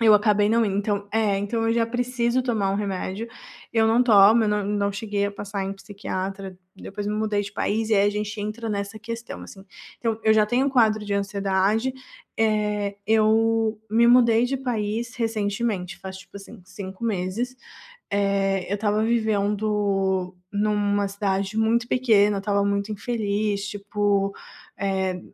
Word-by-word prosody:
Eu 220 -2 +6
acabei 210 -1 +3
não 230 +1 +3
indo. 195 -2 -1
Então, 205 0 -1
eh 215 -3 +2
então 225 +3 -1
eu - - +3
já 230 0 +1
preciso 245 +1 0
tomar 220 -6 0
um - - 0
remédio. 200 +2 -3 0.4
Eu 225 -1 +3
não 230 +2 +4
tomo, 220 -1 +6
eu - - +1
não 210 -1 0
não 200 0 0
cheguei 200 0 -2
a 200 - -5
passar 200 -1 -4
em 195 - -3
psiquiatra. 195 -1 -6 0.2
Depois 205 +1 -6
me 210 - -1
mudei 215 -1 0
de 205 0 -8
país, 220 +2 -1
e - - +4
aí 200 0 +4
a - - 0
gente 210 0 -4
entra 215 +2 -4
nessa 200 0 -3
questão, 230 +2 -7
assim. 195 -1 -12 0.3
Então, 225 -2 -1
eu 220 - +5
já 215 -1 +4
tenho 250 +4 +1
um - - +1
quadro 220 -5 +3
de 205 - -3
ansiedade, 200 +4 0 0.5
eh, 210 -2 0
eu 220 0 +2
me 235 +2 +4
mudei 235 -1 +5
de 270 +2 -1
país 235 -1 -3
recentemente, 215 -4 -2
faz 190 0 -8
tipo 190 - -13
assim, 200 +2 -11
5 190 +2 -8
meses. 220 +4 -2 0.6
Eh, 195 -2 0
eu - - +1
estava 210 +1 0
vivendo 205 -4 0 0.2
numa 205 -1 +1
cidade 200 +1 -2
muito 230 +2 +2
pequena, 210 -6 +3
eu 195 - -2
estava 200 0 +1
muito 200 +1 -1
infeliz, 205 -2 -2
tipo, 205 -1 0 0.5
eh, 190 -2 -1
210 Hz, 170 wpm, -24 LUFS, 200-225 Hz, 0.6 s, Eu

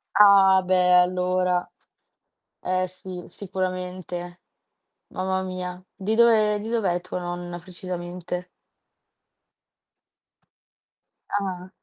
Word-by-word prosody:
Ah, 195 -2 +7
beh, 185 - +3
e 180 0 +4
allora! 180 0 +1 0.9
Eh, 185 0 0
sì. 185 -1 -4
Sicuramente. 180 -2 -5 0.7
Mamma 190 0 -2
mia. 185 -1 -5
Di 205 +3 -2
dove 220 -2 +4
di 215 +2 -6
dov'è 195 -7 0
tua 180 0 -5
nonna 175 0 -5
precisamente? 180 0 -6 2.8
Ah. 185 -2 -3
185 Hz, 85 wpm, -24 LUFS, 180-190 Hz, 2.8 s, Ah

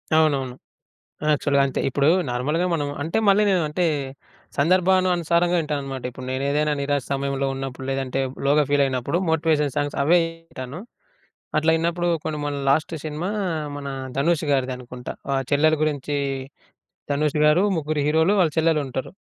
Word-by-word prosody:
అవునవును. 140 -5 +2 0.8
యాక్చువల్‌గా 140 -1 +2
అంతే. 135 - -3
ఇప్పుడు 140 +2 +1 0.2
నార్మల్‌గా 150 +8 0
మనం 145 -3 -1
అంటే 165 +7 -1
మళ్ళీ 200 +2 +5
నేను 185 -3 +3
అంటే 175 +3 0 0.7
సందర్భాను 185 +4 +3
అనుసారంగా 175 +1 +2
ఇంటానన్మానమాట. 135 -4 -4
ఇప్పుడు 130 +1 -9
నేనెదైనా 145 +3 0
నిరాశ 140 -1 0
సమయంలో 140 0 -1
ఉన్నప్పుడు 135 -1 -6
లేదంటే 135 0 -2 0.3
లోగా 150 +2 +4
ఫీల్ 145 -1 +4
అయినప్పుడు 130 +5 -1
మోటివేషన్ 155 -3 +1
సాంగ్స్ 145 0 -1
అవే 175 +4 +5 0.3
ఇంటాను. 130 +6 -7 0.8
అట్లా 160 +1 +3
ఇన్నప్పుడు 170 +1 0 0.2
కొన్ని 155 - -3
మన 145 - -2
లాస్ట్ 155 +4 +2
సినిమా 155 +5 -3 0.5
మన 140 -1 -6 0.3
ధనుష్ 160 +2 +1
గారిది 130 -2 +1
అనుకుంట. 125 0 -11 0.2
ఆ - - +2 0.2
చెల్లెలు 155 +2 +4
గురించి 145 -1 -1 1.0
ధనుష్ 150 +1 0
గారు 160 +6 +4
ముగ్గురు 155 0 -2
హీరోలు 160 +5 +3
వాళ్ళ 165 -4 +3
చెల్లెలు 160 -2 +3
ఉంటరు. 130 0 -5
150 Hz, 145 wpm, -23 LUFS, 135-160 Hz, 1.0 s, మళ్ళీ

